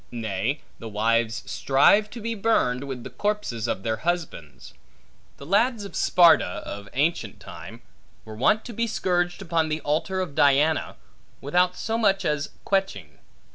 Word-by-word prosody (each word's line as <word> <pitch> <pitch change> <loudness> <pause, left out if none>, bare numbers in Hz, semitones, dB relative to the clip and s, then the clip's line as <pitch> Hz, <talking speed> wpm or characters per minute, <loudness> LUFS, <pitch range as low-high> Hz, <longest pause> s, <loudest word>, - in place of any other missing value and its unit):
Nay, 115 +3 -3 0.2
the 115 - -7
wives 115 +2 0
strive 200 +10 +3
to 235 - -9
be 230 +2 -2
burned, 195 - +1
with 130 -3 -6
the - - -8
corpses 205 - -2
of 95 - -3
their 110 +1 -1
husbands. 160 - -4 0.6
The 140 - -11
lads 210 - +1
of 200 - -10
Sparta, 165 - +4
of 100 -1 -8
ancient 140 - -1
time, - - -11 0.4
were 110 - -9
wont 170 - +2
to 240 - -7
be 230 +2 -1
scourged 175 -3 -1
upon 165 -3 0
the 155 0 -1
altar 155 +6 -1
of 180 -6 -3
Diana, 145 +2 +2 0.4
without 180 +5 +1
so 225 +1 -2
much 195 -3 +2
as 150 -2 -1 0.2
queching. 100 - -2
155 Hz, 155 wpm, -25 LUFS, 115-195 Hz, 0.6 s, Sparta